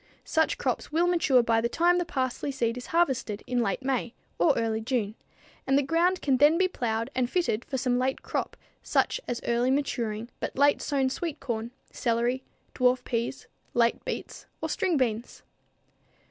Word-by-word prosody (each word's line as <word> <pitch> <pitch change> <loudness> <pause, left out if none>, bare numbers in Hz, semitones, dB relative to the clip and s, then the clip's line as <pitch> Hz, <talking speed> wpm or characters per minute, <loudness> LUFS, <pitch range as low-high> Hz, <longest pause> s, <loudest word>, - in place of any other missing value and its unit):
Such 320 0 +1
crops - - -2
will 330 +3 +3
mature 320 -8 +4
by 225 -1 +2
the 235 - 0
time 350 +5 +3
the 350 - -1
parsley 260 -1 -2
seed 235 -3 -1
is 245 - -7
harvested 265 -11 0
in 245 -1 0
late 230 +2 -1
May 260 -3 -1 0.2
or 300 - +4
early 225 -1 0
June, 220 -3 -1 0.5
and 270 +1 +4
the 285 - +3
ground 340 +5 +1
can 270 -3 +3
then 295 +5 +5
be 370 +1 +3
plowed 230 -9 -2
and 250 -1 0
fitted 335 -10 0
for 270 - -4
some 250 -1 +1
late 260 +1 -1
crop - - -3 0.2
such - - +1
as 240 - -3
early 240 +2 +2
maturing 235 -5 -1
but - - -4
late 285 +1 +4
sown 270 -2 0
sweet 320 0 -4
corn, 235 -3 -3 0.2
celery, 240 +1 0 0.3
dwarf 250 0 +2
peas, 235 - -3 0.3
late 235 -1 +2
beets - - -6
or - - -3
string 365 -5 +1
beans. 235 -3 -2
255 Hz, 175 wpm, -27 LUFS, 235-290 Hz, 0.5 s, then